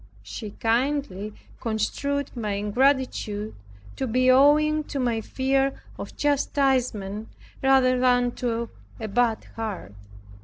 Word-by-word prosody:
She 115 - -7
kindly 225 -3 -1 0.2
construed 270 +6 -2
my 215 -4 -2
ingratitude 215 -1 0 0.4
to 265 - -1
be 255 +2 +3
rather 255 - +6
owing 305 +2 +4
to 280 - -4
my 235 -3 0
fear 270 +3 0 0.2
of - - -8
chastisement, 255 -8 0 0.3
than 255 -2 +4
to 235 -1 -2 0.3
a 220 - -4
bad 225 +1 +1
heart. 210 - -5
245 Hz, 110 wpm, -25 LUFS, 220-270 Hz, 0.4 s, rather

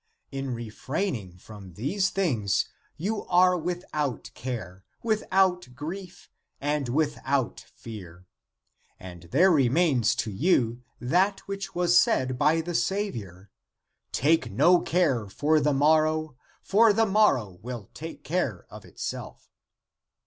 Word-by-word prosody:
In 135 -2 -3
re 115 0 -6
fraining 120 - -3
from 100 -3 -12
these 185 - 0
things, 120 - 0 0.3
you 205 +6 -2
are 180 0 +4
without 160 - -3
care, 100 -7 -6 0.2
without 190 - +1
grief, 175 +6 -7 0.3
and 145 -2 -1
without 140 -2 0 0.2
fear, 90 -6 -10 0.7
and 90 -2 -11
there 180 +9 +5
remains 135 -4 +3
to 110 - -2
you 120 - +1 0.2
that 185 - +1
which 195 -1 -6
was 175 0 +5
said 130 -4 +1
by 155 +3 +3
the 175 +2 -5
Saviour: 110 - -3 0.6
Take 160 +4 +2
no 175 0 +5
care 140 - +1
for 150 +9 +2
the 150 0 +2
morrow, 155 +1 +2 0.3
for 220 +3 +5
the 225 +2 +3
morrow 160 - +2
will 120 -3 -7
take 165 +2 -8
care 140 - -2
of - - -10
itself. - - -7
150 Hz, 120 wpm, -27 LUFS, 115-180 Hz, 0.7 s, there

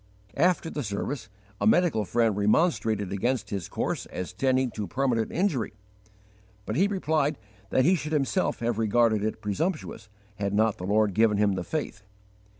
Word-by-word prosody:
After 170 +1 +2
the 150 - -3
service 115 +2 -4 0.3
a - - +1
medical 175 - +3
friend 115 0 +1
remonstrated 105 - +1
against 110 +1 -1
his 95 -5 -4
course - - -2
as 90 - -6
tending 130 -1 +1
to 105 -2 -4
permanent 120 0 0
injury; 160 - 0 0.9
but 110 - -3
he 190 +8 +4
replied 155 -7 0 0.3
that 130 - +3
he 180 - +5
should 155 -4 -2
himself 150 +3 0
have 115 -1 -1
regarded 110 -1 +2
it 110 +1 -3
presumptuous 125 - -3 0.3
had 100 -1 -1
not 110 0 +2
the 90 - -5
Lord 105 0 +2
given 110 +1 +3
him 105 -1 +3
the 95 -2 -3
faith. 145 - -4
115 Hz, 160 wpm, -27 LUFS, 105-150 Hz, 0.9 s, he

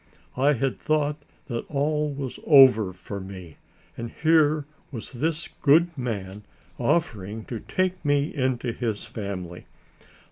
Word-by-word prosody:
I 140 +3 +4
had 135 0 -1
thought 150 -1 +1 0.3
that 120 -5 -3
all 150 +1 0
was 135 -2 -5
over 130 - +7
for 95 +2 -7
me, 95 -4 -9 0.4
and 115 0 -5
here 155 -1 +3 0.3
was 115 -5 -7
this 155 +5 -2
good 165 +4 +4
man 105 -7 -4 0.4
offering 115 - -1
to 115 - -5
take 185 +5 -1
me 145 0 +1
into 130 -3 0
his 115 -3 -3
family. 90 -5 -6
130 Hz, 130 wpm, -25 LUFS, 110-150 Hz, 0.4 s, over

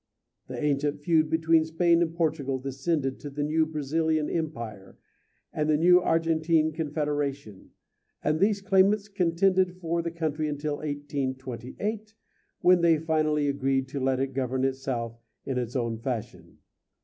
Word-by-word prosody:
The 125 - -6
ancient 145 +1 0
feud 155 0 +2
between 160 0 +3
Spain 170 +1 +2
and 165 -1 +1
Portugal 155 -5 0
descended 135 +1 -2
to 145 - -7
the 145 +1 -3
new 155 +1 +1
Brazilian 155 +1 0
Empire 115 - -5 0.6
and 155 0 -1
the 150 - +4
new 180 +3 +6
Argentine 165 -1 +2
Confederation, 145 - -3 0.5
and 155 +1 +1
these 200 +1 +2
claimants 200 +1 +3
contended 185 -1 +1
for 170 -1 -1
the 170 - -3
country 155 -2 -2
until 145 0 -3
1828, 145 - -4 0.5
when 180 -1 +5
they 165 -2 +5
finally 155 -2 +1
agreed 135 -1 0
to 140 0 -4
let 130 0 +1
it 135 0 -2
govern 130 0 -1
itself 130 -4 -2 0.3
in 130 -2 -1
its 120 0 -4
own 115 -3 -1
fashion. 120 -2 -5
150 Hz, 140 wpm, -27 LUFS, 135-165 Hz, 0.6 s, new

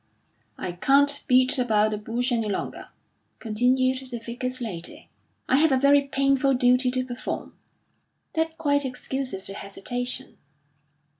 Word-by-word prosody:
"I 180 - -4
can't 280 +10 +3
beat 255 +1 +4
about 215 -3 +2
the 210 - -1
bush 240 +4 -2
any 225 -3 0
longer," 200 - -4 0.5
continued 255 +4 +1
the 240 - -4
Vicar's 245 +2 -4
lady; 185 -9 -6 0.4
"I 260 - +4
have 315 +1 +4
a 265 - +4
very 280 +2 +5
painful 275 0 +2
duty 250 +1 +4
to 255 0 0
perform." 245 -1 -5 0.8
"That 320 0 -1
quite 285 -3 +1
excuses 255 -5 -4
your 195 - -6
hesitation." 245 +6 -5
255 Hz, 135 wpm, -25 LUFS, 235-275 Hz, 0.8 s, very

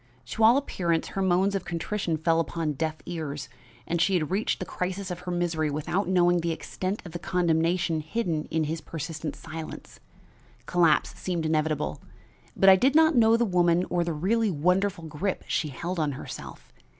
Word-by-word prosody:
To 220 - 0
all 230 +4 +7
appearance 170 -12 -1
her 195 - -3
moans 190 +1 +2
of 195 -2 -1
contrition 170 0 -2
fell 165 +1 +2
upon 165 -2 -1
deaf 155 +2 -2
ears, 150 -4 -5 0.4
and 170 0 -1
she 190 +2 +3
had 160 -2 0
reached 200 +4 0
the 185 - -4
crisis 185 +1 -4
of 175 - -5
her 180 0 -6
misery 170 -3 0
without 155 +7 -1
knowing 175 -1 +3
the 170 0 -1
extent 185 +4 -4
of 175 - -8
the 175 - -5
condemnation 170 -1 +1
hidden 160 -2 -2
in 160 -1 -1
his 160 +2 -3
persistent 160 0 -5
silence. 160 0 -8 0.7
Collapse 170 -4 +3
seemed 175 -3 -2
inevitable, 155 -1 0 0.6
but 195 - +4
I 190 0 +9
did 265 +8 +2
not 320 0 +6
know 230 -1 +5
the 235 - +2
woman 175 -2 +3
or 175 -1 +2
the 170 - -2
really 205 +8 +1
wonderful 180 +3 +1
grip 165 +5 -3
she 155 - 0
held 170 +6 -4
on 150 -2 0
herself. 135 - -9
175 Hz, 180 wpm, -27 LUFS, 160-190 Hz, 0.7 s, I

